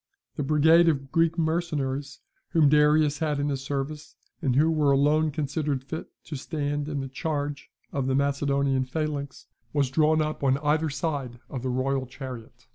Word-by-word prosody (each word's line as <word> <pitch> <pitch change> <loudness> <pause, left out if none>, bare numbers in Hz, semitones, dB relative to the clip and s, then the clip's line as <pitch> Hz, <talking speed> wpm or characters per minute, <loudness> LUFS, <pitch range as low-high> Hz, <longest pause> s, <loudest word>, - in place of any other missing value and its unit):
The - - -3
brigade 160 +4 +5
of 135 -3 -2
Greek 165 0 +2
mercenaries, 150 -5 -1 0.3
whom 155 -4 +5
Darius 150 0 +4
had 150 -3 0
in 145 +1 0
his 135 -2 -2
service, 145 +2 -4 0.3
and 135 -6 +1
who 155 +4 +4
were 150 -3 +3
alone 150 +3 +3
considered 145 -2 -2
fit 160 +4 -6 0.2
to 155 - -7
stand 145 0 -3
in 145 -2 -2
the 135 - -4
charge 145 0 -3 0.2
of 135 -2 -1
the 130 - +1
Macedonian 140 -1 +1
phalanx, 145 0 -4 0.3
was 140 -3 +1
drawn 155 +2 +3
up 155 -1 -2
on 135 -1 +3
either 155 +2 +1
side 140 -5 -3
of 130 - -4
the 130 - -2
royal 130 +1 -1
chariot. 130 -3 -9
145 Hz, 170 wpm, -26 LUFS, 135-155 Hz, 0.3 s, brigade